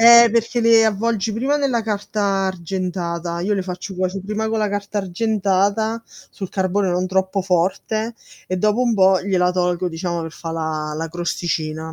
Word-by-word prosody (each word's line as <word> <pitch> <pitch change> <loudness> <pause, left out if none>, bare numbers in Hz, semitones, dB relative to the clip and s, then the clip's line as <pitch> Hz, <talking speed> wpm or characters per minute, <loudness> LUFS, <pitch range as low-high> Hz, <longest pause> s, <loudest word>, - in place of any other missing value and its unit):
Eh, 235 0 +9
perché 230 +2 +1
le 230 -1 +6
avvolgi 220 0 0
prima 265 +7 +1
nella 265 -5 +1
carta 210 0 -3 0.3
argentata. 175 -2 -3
Io 200 +4 0
le 195 - -1
faccio 185 +1 -6
cuoce' 185 +1 -1
prima 215 +2 -2
con 225 - -1
la 210 - +1
carta 205 +1 -3
argentata, 205 +2 0 0.3
sul 195 -3 -6
carbone 190 +1 0
non 180 +1 0
troppo 190 +1 0
forte, 195 +5 0 0.3
e 185 - -2
dopo 210 +5 +2
un 240 -2 +2
po' 190 -2 +5
gliela 185 -2 +2
tolgo, 180 0 0
diciamo 170 0 -3
per 160 - -5
fà 165 -1 -6
la 155 -2 -3
la 165 +1 -3
crosticina. 160 -2 -3
190 Hz, 170 wpm, -21 LUFS, 175-220 Hz, 0.3 s, Eh